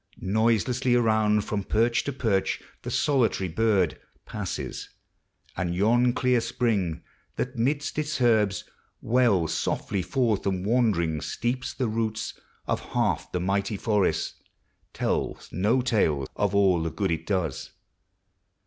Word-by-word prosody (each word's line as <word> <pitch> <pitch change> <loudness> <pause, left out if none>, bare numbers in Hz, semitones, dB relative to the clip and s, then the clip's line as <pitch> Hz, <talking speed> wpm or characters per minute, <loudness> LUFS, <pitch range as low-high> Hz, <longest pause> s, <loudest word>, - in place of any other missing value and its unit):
Noiselessly 115 +5 +1
around, 110 -3 +3
From 105 -1 -2
perch 115 +4 +2
to 140 - -1
perch, 110 -8 0 0.2
the - - -6
solitary 125 -9 +1
bird 95 -1 +1 0.2
Passes; 100 -5 -5 0.7
and 85 0 -2
yon 120 +6 +3
clear 125 -1 +2
spring, 105 -8 -1 0.3
that, 125 +1 -3
midst 145 +6 -1
iis 150 -1 -2
herbs, 110 -5 +3 0.4
Wells 105 -9 +2
softly 95 - -1
forth 110 +2 0
and 95 -1 -1
wandering 100 -10 +1
sleeps 125 +2 -2
the 130 - -1
roots 110 -1 -2 0.3
Of - - 0
half - - 0
the 90 - -1
mighty 100 +3 -1
forest, 105 -2 0 0.5
tells - - -2
no 110 +8 +1
tale 80 - +1
Of 100 -1 0
all 95 -4 +4
the 80 - -1
good 80 - -1
it 80 0 -3
does. 90 -9 -2
110 Hz, 130 wpm, -26 LUFS, 95-120 Hz, 0.7 s, all